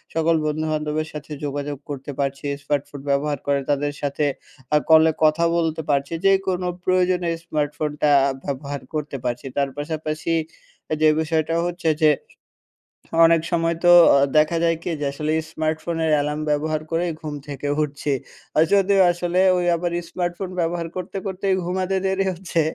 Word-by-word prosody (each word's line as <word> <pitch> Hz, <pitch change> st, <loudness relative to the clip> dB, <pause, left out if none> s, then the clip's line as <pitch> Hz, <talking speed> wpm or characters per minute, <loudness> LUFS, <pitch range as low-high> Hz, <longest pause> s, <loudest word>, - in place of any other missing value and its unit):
সকল 165 Hz, 0 st, +3 dB
বন্ধুবান্ধবের 155 Hz, 0 st, -1 dB
সাথে 150 Hz, 0 st, -8 dB
যোগাযোগ 145 Hz, 0 st, -3 dB
করতে 140 Hz, 0 st, -5 dB
পারছি, 140 Hz, +1 st, -2 dB, 0.2 s
স্মার্টফোন 145 Hz, -1 st, -2 dB
ব্যবহার 140 Hz, 0 st, 0 dB
করে 140 Hz, -1 st, +2 dB
তাদের 145 Hz, 0 st, 0 dB
সাথে 145 Hz, +1 st, -1 dB, 0.4 s
অ্যা 150 Hz, -, +4 dB
কলে 160 Hz, 0 st, +7 dB
কথা 155 Hz, +2 st, +4 dB
বলতে 160 Hz, -1 st, 0 dB
পারছি 140 Hz, +2 st, 0 dB
যে 195 Hz, -, +7 dB, 0.2 s
কোনো 180 Hz, -1 st, 0 dB, 0.2 s
প্রয়োজনে, 180 Hz, -1 st, +2 dB, 0.2 s
স্মার্টফোনটা 150 Hz, -1 st, -1 dB, 0.3 s
ব্যবহার 140 Hz, 0 st, -4 dB
করতে 150 Hz, -2 st, -3 dB
পারছি। 125 Hz, +2 st, -3 dB
তার 140 Hz, -1 st, +1 dB
পাশাপাশি 155 Hz, +2 st, -3 dB, 0.7 s
যে 155 Hz, -, +6 dB
বিষয়টা 160 Hz, +1 st, 0 dB
হচ্ছে 175 Hz, -2 st, -1 dB
যে, 155 Hz, -, +6 dB, 1.2 s
অনেক 165 Hz, -1 st, +5 dB
সময় 165 Hz, -1 st, +1 dB
তো 175 Hz, -, +7 dB, 0.3 s
অ -, -, +5 dB, 0.2 s
দেখা 155 Hz, +2 st, +3 dB
যায় 165 Hz, -1 st, +2 dB
কি -, -, -3 dB
যে, -, -, -1 dB
আসলে 155 Hz, +2 st, -2 dB, 0.2 s
স্মার্টফোনের 160 Hz, +1 st, -1 dB
অ্যালার্ম 150 Hz, +1 st, 0 dB
ব্যবহার 155 Hz, +1 st, 0 dB
করেই 170 Hz, +1 st, 0 dB
ঘুম 150 Hz, -1 st, -5 dB
থেকে 145 Hz, 0 st, -4 dB
উঠছি, 145 Hz, 0 st, -2 dB, 0.4 s
আর 155 Hz, -, +6 dB
যদিও 195 Hz, 0 st, +4 dB
আসলে 175 Hz, +1 st, 0 dB, 0.2 s
ওই 175 Hz, -, 0 dB
আবার 175 Hz, +1 st, -2 dB, 0.2 s
স্মার্টফোন 180 Hz, +1 st, -3 dB
ব্যবহার 170 Hz, 0 st, -1 dB
করতে, 185 Hz, +2 st, -5 dB
করতেই 190 Hz, 0 st, 0 dB
ঘুমাতে 185 Hz, +1 st, -1 dB
দেরি 190 Hz, 0 st, +1 dB
হচ্ছে, 170 Hz, -2 st, -2 dB
155 Hz, 150 wpm, -22 LUFS, 145-170 Hz, 1.2 s, কলে